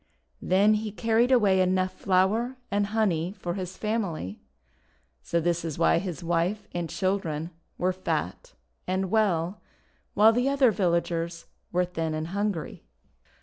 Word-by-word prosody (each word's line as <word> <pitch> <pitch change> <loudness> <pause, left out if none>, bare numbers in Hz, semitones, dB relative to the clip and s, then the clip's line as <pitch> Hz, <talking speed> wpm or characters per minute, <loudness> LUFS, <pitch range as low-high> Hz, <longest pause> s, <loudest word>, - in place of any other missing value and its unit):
Then 200 +4 +4
he 215 0 -2
carried 230 +3 +2
away 200 -7 +4
enough 185 0 +1
flour 200 +8 +1
and 205 0 +1
honey 195 -4 0
for 175 -2 -3
his 185 -1 -5
family. 195 - -3 0.8
So 170 - 0
this 170 0 0
is 160 -3 -4
why 165 0 +4
his 180 -1 -5
wife 175 +5 0
and 175 -2 -3
children 175 -4 -2 0.3
were 185 +1 +1
fat 190 - -3 0.3
and 190 0 -1
well, 195 -4 +1 0.5
while 215 +2 +6
the 245 +3 +1
other 275 -4 +4
villagers 170 -3 -1 0.3
were 180 +1 +2
thin 165 -3 -3
and 155 +1 -4
hungry. 200 -3 -3
185 Hz, 140 wpm, -27 LUFS, 170-210 Hz, 0.8 s, while